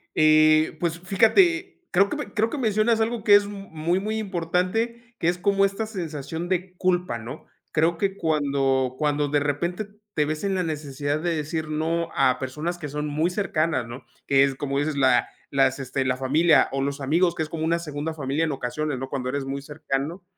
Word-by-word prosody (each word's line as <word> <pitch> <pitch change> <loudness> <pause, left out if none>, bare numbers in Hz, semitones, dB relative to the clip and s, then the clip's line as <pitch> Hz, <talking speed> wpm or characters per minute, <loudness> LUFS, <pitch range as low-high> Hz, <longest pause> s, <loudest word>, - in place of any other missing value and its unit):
eh, 155 0 +5
pues, 170 -1 -1
fíjate, 345 - +2
creo 200 +2 +4
que - - -3
me 295 - -6
creo 225 +1 +1
que 295 - -4
mencionas 220 -1 +2
algo 225 -1 -1
que 205 -1 +7
es 205 0 +5
muy, 185 -3 -2
muy 215 +2 -2
importante, 215 +5 -2
que 165 - 0
es 175 +1 +2
como 195 +1 +3
esta 195 +3 -2
sensación 165 -5 -5
de 185 0 -2
culpa, 180 -8 0
¿no? 115 +3 -9 0.3
Creo 165 +2 +2
que 195 +2 -1
cuando 140 -4 +1
cuando 150 -1 +1
de 145 0 +2
repente 170 +8 -2 0.3
te 150 -3 +1
ves 155 +4 -3
en 195 -1 0
la 180 - 0
necesidad 145 -2 -3
de 170 0 -1
decir 155 +1 -3
no 165 +2 -1
a 130 -1 +3
personas 150 +7 -3
que 150 -4 -6
son 150 +1 -3
muy 155 +4 0
cercanas, 165 - -1
¿no?, 120 +3 -9 0.2
que 135 0 +5
es 135 -1 +1
como 140 0 -2
dices, 150 0 -1
la 130 -3 +3 0.2
las 135 -1 +2
este 135 0 -2
la 125 0 0
familia 155 +5 +4
o 135 0 -1
los 140 +1 -2
amigos, 170 +5 +2
que 160 - -1
es 155 - -7
como 160 -1 -4
una 170 +1 +1
segunda 155 0 -4
familia 145 +1 -1
en 155 - -1
ocasiones, 140 +2 -3
¿no?, 135 0 -5
cuando 130 -2 -3
eres 140 0 -2
muy 140 +1 -4
cercano. 150 +4 -4
160 Hz, 205 wpm, -24 LUFS, 140-185 Hz, 0.3 s, que